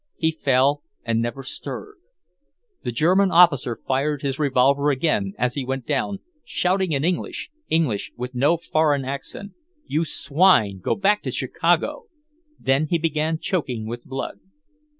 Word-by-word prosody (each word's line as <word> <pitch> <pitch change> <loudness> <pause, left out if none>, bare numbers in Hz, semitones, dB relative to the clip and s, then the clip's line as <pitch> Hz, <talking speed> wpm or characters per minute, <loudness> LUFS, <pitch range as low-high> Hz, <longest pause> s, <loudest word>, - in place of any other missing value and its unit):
He 160 -1 +1
fell, 140 -1 +2 0.2
and 115 -1 +1
never 120 +3 -3
stirred. 415 - -7 0.9
The - - -2
German 185 +10 +3
officer 165 -9 +5
fired 140 +4 -1
his 140 0 -2
revolver 140 0 +3
again 130 -9 0
as 125 +1 0
he 140 - -3
went 130 -1 -3
down, 190 +7 -1 0.2
shouting 185 0 0
in 140 -1 0
English, 180 - -2 0.2
English 150 -11 0
with 125 +1 -5
no 145 +7 +3
foreign 155 -4 +1
accent, 140 +9 -6 0.3
"You 155 +3 0
swine, 140 - +3
go - - 0
back 205 +1 +2
to - - -4
Chicago!" - - 0 0.5
Then 135 +3 +1
he 170 - +1
began 160 0 0
choking 130 - -2
with 120 +2 -6
blood. 135 0 -5
145 Hz, 145 wpm, -23 LUFS, 130-165 Hz, 0.9 s, officer